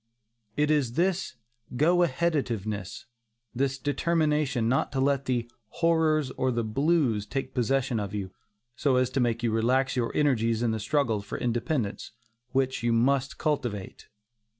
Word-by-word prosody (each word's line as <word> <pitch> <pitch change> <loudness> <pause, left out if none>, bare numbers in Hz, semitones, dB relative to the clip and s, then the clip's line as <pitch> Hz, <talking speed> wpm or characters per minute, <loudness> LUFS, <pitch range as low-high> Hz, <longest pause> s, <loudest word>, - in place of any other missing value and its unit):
It 150 +1 +2
is 140 -6 +1
this 180 +1 0 0.4
go 165 +7 +3
aheaditiveness, 130 - -1 0.5
this 135 +1 0
determination 150 -3 0
not 130 +3 +1
to 135 - -1
let 140 0 +1
the 120 -2 -1 0.2
"horrors" 160 -2 +2
or 130 0 0
the 120 -1 -1
"blues" 125 -3 +1
take 135 +3 -4
possession 125 -1 0
of 100 -2 -4
you, 100 -3 -4 0.4
so 140 -1 +1
as 130 0 +2
to 135 - -1
make 120 -1 0
you 115 - +1
relax 125 +5 +1
your 120 -2 0
energies 115 -6 +2
in 115 - +2
the 110 - -2
struggle 115 -2 0
for 100 - -6
independence, 120 -2 -2 0.4
which 130 -1 0
you 120 0 +1
must 135 +3 +1
cultivate. 120 - -3
130 Hz, 150 wpm, -27 LUFS, 115-145 Hz, 0.5 s, go